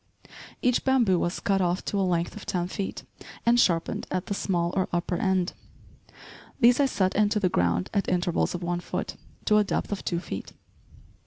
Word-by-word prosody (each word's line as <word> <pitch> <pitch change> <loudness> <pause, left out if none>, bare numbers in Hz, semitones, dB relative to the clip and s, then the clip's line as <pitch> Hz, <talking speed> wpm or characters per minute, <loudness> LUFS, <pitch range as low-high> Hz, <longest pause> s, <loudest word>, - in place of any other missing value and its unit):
Each 250 -1 +2
bamboo 240 -9 +3
was 175 - -1
cut 195 -1 +1
off 180 0 0
to 200 - -1
a - - +2
length 175 -2 0
of 210 - -8
ten 175 -1 -1
feet, 195 +1 -4 0.4
and 240 +1 +5
sharpened 170 -7 +1
at 185 -1 -2
the - - -2
small, 175 -3 -1
or 190 -1 0
upper 175 +1 -1
end. 190 -2 +1 1.1
These 245 0 +6
I 280 - +4
set 190 -7 +1
into 210 +1 +2
the 185 -3 +2
ground 90 - 0
at 200 - 0
intervals 180 -1 0
of 175 - -5
one 175 0 -1
foot, 175 - -4 0.3
to 210 - +4
a - - +4
depth 200 - -2
of 200 - -3
two 170 - -1
feet. 125 - -7
185 Hz, 190 wpm, -27 LUFS, 175-205 Hz, 1.1 s, These